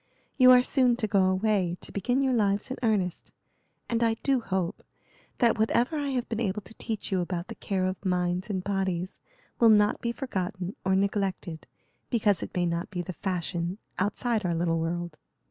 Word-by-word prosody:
You 255 Hz, -2 st, +7 dB
are 250 Hz, 0 st, +7 dB
soon 255 Hz, -2 st, +3 dB
to 235 Hz, -, -1 dB
go 200 Hz, -3 st, +3 dB
away 185 Hz, -2 st, +1 dB
to -, -, -9 dB
begin 245 Hz, +7 st, 0 dB
your 265 Hz, -1 st, +2 dB
lives 205 Hz, +1 st, +1 dB
in 260 Hz, -, -3 dB
earnest, 205 Hz, -7 st, 0 dB, 0.6 s
and 235 Hz, 0 st, 0 dB
I 225 Hz, -1 st, +3 dB
do 270 Hz, -2 st, +3 dB
hope 190 Hz, -4 st, -2 dB, 0.6 s
that 235 Hz, -2 st, +3 dB
whatever 235 Hz, +6 st, +2 dB
I 290 Hz, -1 st, -1 dB
have 255 Hz, -3 st, -1 dB
been 225 Hz, -, -3 dB
able 210 Hz, -2 st, -1 dB
to 195 Hz, -, -13 dB
teach 220 Hz, -3 st, -5 dB
you 185 Hz, -2 st, +2 dB
about 175 Hz, 0 st, -4 dB
the -, -, -4 dB
care 190 Hz, -2 st, -2 dB
of 185 Hz, +1 st, -3 dB
minds 180 Hz, 0 st, 0 dB
and 190 Hz, -3 st, -2 dB
bodies 190 Hz, -2 st, -2 dB, 0.4 s
will 230 Hz, -, +7 dB
not 210 Hz, -1 st, +4 dB
be 235 Hz, -, -1 dB
forgotten 190 Hz, -7 st, -4 dB
or 190 Hz, 0 st, +2 dB
neglected 195 Hz, -4 st, -1 dB, 0.4 s
because 210 Hz, -5 st, +2 dB
it -, -, -7 dB
may 180 Hz, -1 st, +1 dB
not 170 Hz, 0 st, -2 dB
be 180 Hz, -3 st, -3 dB
the 185 Hz, -, -6 dB
fashion 175 Hz, 0 st, -3 dB, 0.2 s
outside 215 Hz, +3 st, 0 dB
our 175 Hz, -2 st, 0 dB
little 165 Hz, 0 st, +1 dB
world." 170 Hz, 0 st, -3 dB
195 Hz, 190 wpm, -28 LUFS, 180-230 Hz, 0.6 s, You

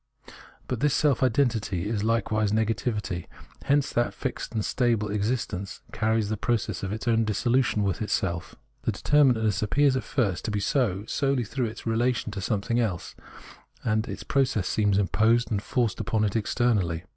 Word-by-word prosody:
But 125 Hz, -, -2 dB
this 145 Hz, 0 st, +2 dB
self 145 Hz, -4 st, +2 dB
identity 110 Hz, -8 st, +1 dB
is 105 Hz, -2 st, -1 dB
Uke 115 Hz, 0 st, 0 dB
wise 110 Hz, -1 st, +1 dB
negativity; 110 Hz, -4 st, -1 dB, 0.4 s
hence 140 Hz, 0 st, +2 dB
that 120 Hz, 0 st, 0 dB
fixed 130 Hz, -, -4 dB
and 110 Hz, -, 0 dB
stable 115 Hz, -4 st, +1 dB
exist 105 Hz, +4 st, -1 dB
ence 95 Hz, +2 st, -6 dB
carries 110 Hz, -1 st, +1 dB
the 110 Hz, -, -1 dB
process 115 Hz, +1 st, -1 dB
of 95 Hz, -, -3 dB
its 110 Hz, +3 st, -5 dB
own 115 Hz, -1 st, +3 dB
dissolution 115 Hz, +1 st, +1 dB
within 100 Hz, +2 st, -1 dB
itself. 85 Hz, -4 st, -2 dB, 0.3 s
The -, -, -1 dB
determinateness 125 Hz, -8 st, +3 dB
appears 135 Hz, +6 st, +3 dB
at 130 Hz, -, -1 dB
first 105 Hz, -7 st, -1 dB
to -, -, -1 dB
be 105 Hz, -1 st, -1 dB
so 105 Hz, -4 st, 0 dB
solely 135 Hz, 0 st, 0 dB
through 125 Hz, +3 st, -2 dB
its 110 Hz, +2 st, -9 dB
relation 120 Hz, 0 st, 0 dB
to 100 Hz, -1 st, -5 dB
something 110 Hz, +4 st, 0 dB
else; 100 Hz, -7 st, -2 dB, 0.7 s
and 110 Hz, +1 st, 0 dB
its -, -, -6 dB
process 130 Hz, -9 st, +1 dB
seems 105 Hz, -2 st, +2 dB
imposed 110 Hz, +4 st, +2 dB
and 100 Hz, -2 st, 0 dB
forced 120 Hz, -2 st, -1 dB
upon 110 Hz, -1 st, 0 dB
it 105 Hz, 0 st, 0 dB
externally. 105 Hz, -7 st, +1 dB
110 Hz, 170 wpm, -26 LUFS, 105-120 Hz, 0.7 s, own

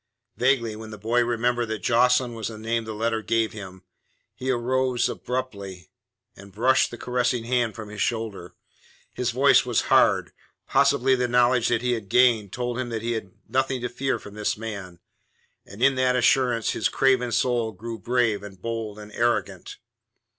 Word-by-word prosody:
Vaguely 125 Hz, -4 st, +1 dB
then 110 Hz, 0 st, -9 dB
the 110 Hz, -, -8 dB
boy 115 Hz, +4 st, +1 dB
remembered 120 Hz, 0 st, 0 dB
that 110 Hz, -1 st, -5 dB
Jocelyn 125 Hz, +1 st, +3 dB
was 115 Hz, -1 st, -4 dB
the 110 Hz, -, -7 dB
name 115 Hz, +1 st, -2 dB
the 110 Hz, -, -5 dB
letter 115 Hz, +1 st, -1 dB
gave 115 Hz, 0 st, 0 dB
him. 95 Hz, -3 st, -10 dB, 0.5 s
He 130 Hz, -, -5 dB
rose 130 Hz, 0 st, +1 dB
abruptly, 100 Hz, -8 st, -5 dB, 0.4 s
and 100 Hz, 0 st, -14 dB
brushed 125 Hz, +6 st, +3 dB
the 120 Hz, -, -9 dB
caressing 125 Hz, -1 st, -1 dB
hand 120 Hz, -2 st, 0 dB
from 110 Hz, -2 st, -8 dB
his 105 Hz, -1 st, -6 dB
shoulder. 110 Hz, -7 st, -3 dB, 0.6 s
His 125 Hz, -1 st, -1 dB
voice 135 Hz, +4 st, +4 dB
was 120 Hz, -3 st, +1 dB
hard -, -, +4 dB, 0.3 s
possibly 140 Hz, -1 st, +3 dB
the 125 Hz, -1 st, +1 dB
knowledge 125 Hz, 0 st, +3 dB
that 120 Hz, 0 st, 0 dB
he 125 Hz, -, +1 dB
had 110 Hz, -5 st, -3 dB
gained 115 Hz, -5 st, +3 dB
told 120 Hz, 0 st, -3 dB
him 125 Hz, -1 st, -3 dB
that 115 Hz, -1 st, -4 dB
he 120 Hz, -, -1 dB
had 110 Hz, -5 st, -4 dB, 0.2 s
nothing 130 Hz, 0 st, 0 dB
to 125 Hz, -, -3 dB
fear 135 Hz, +2 st, -1 dB
from 100 Hz, -, -12 dB
this 105 Hz, 0 st, -2 dB
man, 100 Hz, -5 st, -7 dB, 0.7 s
and 105 Hz, +5 st, -6 dB
in 135 Hz, +1 st, +5 dB
that 130 Hz, -1 st, +1 dB
assurance 125 Hz, -2 st, +2 dB
his 100 Hz, -, 0 dB
craven 130 Hz, -3 st, +2 dB
soul 120 Hz, -1 st, +1 dB
grew 115 Hz, +3 st, -7 dB
brave 120 Hz, -3 st, +1 dB
and 100 Hz, -2 st, -11 dB
bold 115 Hz, 0 st, -4 dB
and 105 Hz, 0 st, -11 dB
arrogant. 120 Hz, +2 st, -1 dB
120 Hz, 175 wpm, -24 LUFS, 110-125 Hz, 0.7 s, in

